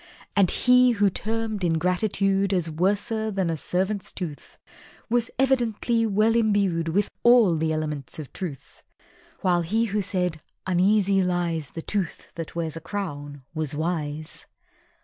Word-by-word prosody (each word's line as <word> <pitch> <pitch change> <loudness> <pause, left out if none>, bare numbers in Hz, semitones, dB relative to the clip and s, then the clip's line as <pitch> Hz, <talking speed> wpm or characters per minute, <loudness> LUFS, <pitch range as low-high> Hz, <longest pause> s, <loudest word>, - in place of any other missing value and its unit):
And 195 -3 +4
he 250 0 +4
who 205 -3 +2
termed 220 0 -3
Ingratitude 195 +3 +1
As 170 -3 +1
"worser 205 +6 0
nor 190 -4 0
a - - -2
servant's 190 +5 -1
tooth" 165 -6 -7 0.5
Was 240 0 +2
evidently 240 -3 +1
well 215 +2 +2
imbued 200 -7 +2
With 200 +5 0
all 235 -7 +6
the 160 0 0
elements 150 -4 -3
of 155 -4 -8
Truth; 165 -9 -7 0.6
(While 175 -2 +2
he 220 +8 +1
who 210 - +2
said 180 -4 -1 0.2
"Uneasy 195 +2 +3
lies 175 -5 0
The 165 +5 -7
tooth 195 -6 -3
that 165 -1 -7
wears 165 -2 -2
a 165 - -7
crown" 145 -8 -5
was 155 -3 -3
wise). 155 -1 -4
185 Hz, 140 wpm, -25 LUFS, 165-210 Hz, 0.6 s, all